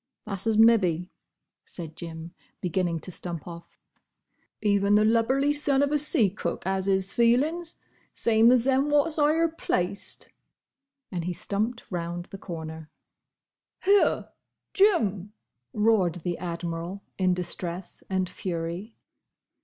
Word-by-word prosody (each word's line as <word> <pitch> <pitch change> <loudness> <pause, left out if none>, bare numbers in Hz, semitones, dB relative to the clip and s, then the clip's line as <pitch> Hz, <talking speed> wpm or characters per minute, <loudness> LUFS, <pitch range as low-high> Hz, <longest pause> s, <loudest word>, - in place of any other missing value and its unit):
"That's 195 +1 -3
as 220 -1 +2
mebbe," 200 -7 +4 0.6
said 160 -3 -9
Jim, 165 0 -8 0.3
beginning 175 -2 -1
to 185 - -8
stump 170 -2 -5
off. 170 -1 -11 0.8
"Even 200 -1 +2
the 210 0 +4
lubberly 260 +6 +2
son 285 -1 +3
of 285 - 0
a 300 - +2
sea 285 - +4
cook 205 - -4
'as 190 0 -1
'is 195 0 +1
feelin's, 295 +9 +2 0.4
same 225 +1 +4
as 250 -2 +4
them 270 +2 +2
wot's 295 +2 +2
'igher 310 +3 +3
placed." 190 - -2 0.8
And 175 -3 -3
he 180 - -2
stumped 215 +6 -2
round 175 0 -4
the 195 - -8
corner. 160 -3 -7 0.9
"Here! 400 +1 +3 0.4
Jim!" 210 - +2 0.4
roared 210 -5 +2
the 175 -1 -2
Admiral, 170 +2 -5 0.2
in 185 -1 +3
distress 175 0 -4
and 185 -1 0
fury. 175 +5 -5
195 Hz, 125 wpm, -26 LUFS, 175-235 Hz, 0.9 s, mebbe